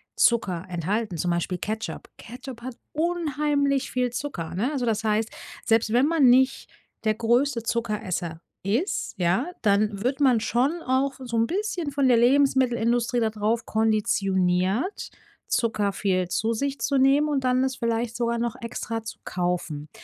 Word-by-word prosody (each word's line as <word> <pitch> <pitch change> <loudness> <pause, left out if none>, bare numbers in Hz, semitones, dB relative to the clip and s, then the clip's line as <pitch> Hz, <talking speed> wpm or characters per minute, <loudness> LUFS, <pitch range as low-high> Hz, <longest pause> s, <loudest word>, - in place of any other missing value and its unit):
Zucker 195 -7 +2
enthalten, 180 +2 -2
zum 175 +3 0
Beispiel 175 +1 -1
Ketchup. 220 +4 -5
Ketchup 245 +1 -9
hat 250 0 -6 0.2
unheimlich 295 -4 0
viel 250 -1 0
Zucker, 240 - -5
ne? 230 +10 -1
Also, 265 -5 -1
das 220 -1 0
heißt, 220 +1 0 0.3
selbst 225 -1 +2
wenn 245 +3 +4
man 300 -5 +4
nicht 260 +2 +3 0.3
der 215 -1 +2
größte 235 +2 +1
Zuckeresser 200 -8 -2 0.2
ist, 230 - -1
ja, 180 - +1 0.2
dann 205 0 +2
wird 265 +3 0
man 255 -5 +4
schon 265 +10 0
auch 265 +2 +1
so 240 -3 -5
'n 225 0 +2
bisschen 370 -5 -2
von 275 -1 +2
der 245 -2 +5
Lebensmittelindustrie 245 -2 +3
da 220 -1 +1
drauf 220 +2 -1
konditioniert, 200 - +1 0.4
Zucker 215 -3 +1
viel 185 -2 0
zu 225 +4 0
sich 280 +4 -2
zu 280 - +1
nehmen 275 +3 +4
und 285 -3 0
dann 255 0 +2
es 265 -1 -1
vielleicht 230 0 -1
sogar 235 0 0
noch 235 0 -2
extra 230 -1 -4
zu 220 - -8
kaufen. 175 -4 -2
235 Hz, 155 wpm, -25 LUFS, 210-265 Hz, 0.4 s, der